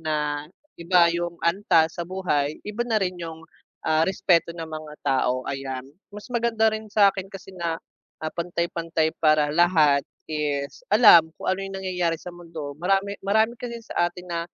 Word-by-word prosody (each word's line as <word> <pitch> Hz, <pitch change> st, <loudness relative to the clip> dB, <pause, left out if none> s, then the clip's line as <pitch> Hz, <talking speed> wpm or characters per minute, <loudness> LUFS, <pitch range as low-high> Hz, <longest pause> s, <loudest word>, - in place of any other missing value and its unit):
na 150 Hz, -2 st, -2 dB, 0.3 s
iba 170 Hz, 0 st, +5 dB
yung 170 Hz, 0 st, -3 dB
antas 170 Hz, -2 st, +3 dB
sa -, -, 0 dB
buhay, 170 Hz, -5 st, -1 dB
iba 210 Hz, +3 st, -5 dB
na 225 Hz, -2 st, +1 dB
rin 185 Hz, -2 st, -1 dB
yung, 160 Hz, -1 st, -7 dB, 0.4 s
ah, 160 Hz, 0 st, +3 dB
respeto 175 Hz, -3 st, +2 dB
ng 165 Hz, -1 st, -5 dB
mga 155 Hz, -1 st, -8 dB
tao, 130 Hz, -2 st, +1 dB
ayan. 135 Hz, -1 st, -4 dB, 0.3 s
Mas 210 Hz, 0 st, -10 dB
maganda 230 Hz, -2 st, +2 dB
rin 220 Hz, 0 st, -6 dB
sa'kin 195 Hz, -2 st, +3 dB
kasi 195 Hz, 0 st, -11 dB
na, 170 Hz, -2 st, -2 dB, 0.5 s
ah, 155 Hz, -, -3 dB
pantay-pantay 170 Hz, -2 st, -1 dB
para 155 Hz, -2 st, +4 dB
lahat 155 Hz, -4 st, +4 dB, 0.2 s
is 145 Hz, -, -3 dB
alam 170 Hz, -8 st, +7 dB
kung -, -, -8 dB
ano 190 Hz, -, -3 dB
yung 195 Hz, 0 st, -5 dB
nangyayari 180 Hz, -3 st, -1 dB
sa 175 Hz, +2 st, -10 dB
mundo. 165 Hz, -4 st, -8 dB
Marami 195 Hz, +2 st, 0 dB
marami 220 Hz, +4 st, +2 dB
kasing 235 Hz, -2 st, -6 dB
sa 175 Hz, -, 0 dB
atin 180 Hz, +1 st, -12 dB
na, 170 Hz, -1 st, -2 dB
170 Hz, 165 wpm, -24 LUFS, 155-195 Hz, 0.5 s, alam